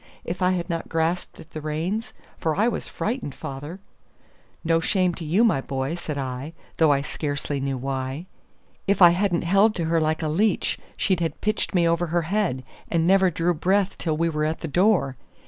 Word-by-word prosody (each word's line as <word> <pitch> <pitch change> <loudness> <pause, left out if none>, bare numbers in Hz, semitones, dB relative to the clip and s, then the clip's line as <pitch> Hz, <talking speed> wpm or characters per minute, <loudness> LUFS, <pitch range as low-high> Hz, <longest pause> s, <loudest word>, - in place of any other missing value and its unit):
If 175 +2 -4
I 180 0 +3
had 175 -2 -2
not 165 -2 -3
grasped 165 +2 -1
at 160 - -13
the 155 - -6
reins 165 +9 -2 0.3
for 160 -2 0
I 215 +4 +3
was 240 - -2
frightened, 230 - -3
father 145 +7 -7 0.4
" - - -33 0.3
"No 165 -1 +3
shame 180 +1 +1
to 170 - -7
you, 175 +9 +3
my 215 - +3
boy," 135 +2 -3
said 155 -4 -4
I, 135 +3 -4 0.2
though 160 -2 +5
I 140 -1 +3
scarcely 145 -1 -3
knew 135 -1 -2
why. 135 +4 -3 0.6
"If 200 0 +2
I 175 -2 +9
hadn't 175 -1 +1
held 200 +5 +4
to 170 - -1
her 165 0 +2
like 155 +1 0
a - - 0
leech, 195 +7 +1 0.2
she'd 190 -3 +1
have 165 -1 -2
pitched 215 -1 -1
me 170 -2 +4
over 170 +1 +1
her 170 +1 0
head, 170 -7 -1 0.3
and 165 -1 +1
never 190 +1 +5
drew 175 +1 +1
breath 190 +4 +1
till 155 -3 -1
we 165 +1 +2
were 150 -2 -1
at 155 +1 -2
the - - -3
door. 175 - +2
165 Hz, 205 wpm, -24 LUFS, 150-185 Hz, 0.6 s, I